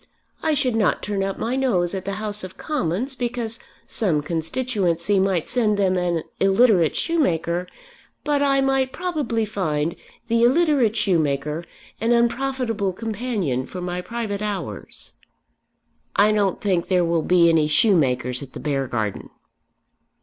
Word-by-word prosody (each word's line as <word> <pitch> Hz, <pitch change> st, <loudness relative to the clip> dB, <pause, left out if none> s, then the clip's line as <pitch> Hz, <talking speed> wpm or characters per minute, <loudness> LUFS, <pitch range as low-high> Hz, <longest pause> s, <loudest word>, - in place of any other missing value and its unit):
I 315 Hz, -1 st, +1 dB
should 255 Hz, -4 st, +1 dB
not 215 Hz, -4 st, +1 dB
turn 205 Hz, -2 st, -2 dB
up 195 Hz, 0 st, -2 dB
my 235 Hz, +3 st, -2 dB
nose 200 Hz, -10 st, +1 dB
at 190 Hz, -1 st, -4 dB
the 200 Hz, -, -2 dB
House 210 Hz, 0 st, -3 dB
of 185 Hz, -1 st, -8 dB
Commons 260 Hz, -, -2 dB
because 240 Hz, -2 st, -2 dB, 0.3 s
some 165 Hz, -9 st, +1 dB
constituency 175 Hz, -, 0 dB
might 190 Hz, -4 st, +1 dB
send 215 Hz, -4 st, +1 dB
them 190 Hz, -2 st, +2 dB
an 175 Hz, -3 st, 0 dB, 0.2 s
illiterate 195 Hz, -4 st, +4 dB
shoemaker; 180 Hz, -, 0 dB, 0.6 s
but 290 Hz, -1 st, +1 dB
I 275 Hz, -1 st, +3 dB
might 270 Hz, -1 st, +1 dB
probably 290 Hz, -10 st, -1 dB
find 165 Hz, -7 st, -1 dB, 0.3 s
the 230 Hz, 0 st, +2 dB
illiterate 265 Hz, -4 st, +3 dB
shoemaker 155 Hz, -5 st, 0 dB, 0.3 s
an 230 Hz, +2 st, +2 dB
unprofitable 235 Hz, -4 st, 0 dB
companion 210 Hz, -, -2 dB
for 185 Hz, -, -7 dB
my 180 Hz, 0 st, -3 dB
private 215 Hz, -1 st, -4 dB
hours." 210 Hz, -2 st, -5 dB, 1.0 s
"I 210 Hz, +2 st, +5 dB
don't 205 Hz, -3 st, +1 dB
think 185 Hz, -4 st, 0 dB
there 180 Hz, -2 st, +2 dB
will 165 Hz, -1 st, +1 dB
be 175 Hz, +1 st, +4 dB
any 160 Hz, -2 st, +3 dB
shoemakers 135 Hz, -, +2 dB
at 135 Hz, -2 st, -10 dB
the -, -, -7 dB
Beargarden." 130 Hz, -8 st, -2 dB
200 Hz, 140 wpm, -22 LUFS, 170-240 Hz, 1.0 s, I